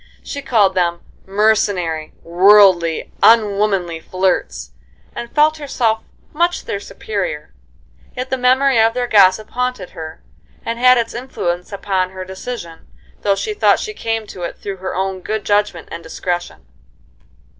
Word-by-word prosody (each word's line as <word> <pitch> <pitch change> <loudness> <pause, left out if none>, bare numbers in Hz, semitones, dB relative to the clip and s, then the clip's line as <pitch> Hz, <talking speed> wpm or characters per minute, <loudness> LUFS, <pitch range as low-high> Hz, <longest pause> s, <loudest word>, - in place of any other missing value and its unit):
She 280 - -6
called 210 -8 +3
them 175 -2 0 0.3
"mercenary, 195 -6 +1
worldly, 180 -2 +4
unwomanly 200 -6 +3
flirts," 185 - -2 0.4
and 235 - -6
felt 305 +1 +3
herself 235 -7 -1 0.3
much 345 +3 0
their 200 - -3
superior. 195 - -5 0.6
Yet 255 +1 -4
the 260 - +1
memory 255 -1 +4
of 225 +1 +3
their 250 -1 0
gossip 205 -2 +4
haunted 250 -7 -3
her, 160 0 -9 0.4
and 230 +1 -3
had 250 0 +6
its 230 -1 -1
influence 180 -8 -4
upon 195 -2 -1
her 185 0 -8
decision, 190 -3 -8 0.3
though 200 -1 +2
she 425 - -3
thought 420 - +3
she 430 - -5
came 225 - -3
to 185 - -10
it 170 - -5
through 200 -1 -6
her 185 0 -5
own 190 0 -2
good 215 +3 -3
judgment 205 -4 0
and 170 - -6
discretion. 175 - -4
200 Hz, 145 wpm, -18 LUFS, 180-235 Hz, 0.6 s, had